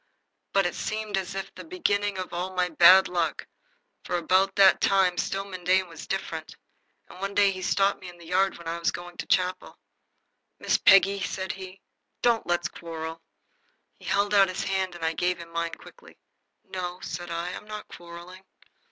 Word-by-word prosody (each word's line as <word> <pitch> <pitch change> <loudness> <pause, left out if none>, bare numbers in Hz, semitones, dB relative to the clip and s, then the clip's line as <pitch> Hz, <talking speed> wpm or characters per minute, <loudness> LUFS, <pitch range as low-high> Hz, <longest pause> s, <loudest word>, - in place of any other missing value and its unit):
But 195 -1 +3
it 175 - 0
seemed 215 -1 -3
as 195 0 -3
if 195 0 -5
that - - -19
were - - -8
the - - -17
beginning 205 - 0
of 185 -1 -5
all 180 +2 -3
my 180 0 +1
bad 180 +3 +7
luck, 170 -3 -1 0.6
for - - -1
about 185 +3 +2
that 195 -1 +6
time 190 -2 +3
Stillman 195 0 -3
Dane 185 +1 +3
was 165 -2 -10
different, 165 -4 -4 0.5
and 180 - -13
one 195 +1 -4
day 200 -1 +5
he 185 -1 -6
stopped 195 +2 +1
me 185 - -8
in 175 - -13
the 170 - -14
yard 190 +3 +1
when 170 - -11
I 170 +1 -3
was 170 - +1
going 175 0 -7
to - - -5
chapel. 185 0 0 0.8
"Miss - - +1
Peggy," 195 0 +6
said 190 0 -3
he, 190 0 -10 0.4
"don't 235 -2 +2
let's 175 0 +1
quarrel." 165 -2 -7 0.8
He - - -15
held 200 +1 +1
out 195 -2 +6
his 185 - -3
hand, 190 -2 -1
and 165 -1 -4
I 160 - +1
gave 180 +2 0
him 170 -1 -11
mine 170 0 -2
quickly. - - -16 0.5
"No," 180 -1 -5
said 175 0 -6
I, 170 +1 -3
"I'm 180 - -7
not 215 0 -7
quarrelling." 175 +2 -11
185 Hz, 195 wpm, -26 LUFS, 175-195 Hz, 0.8 s, bad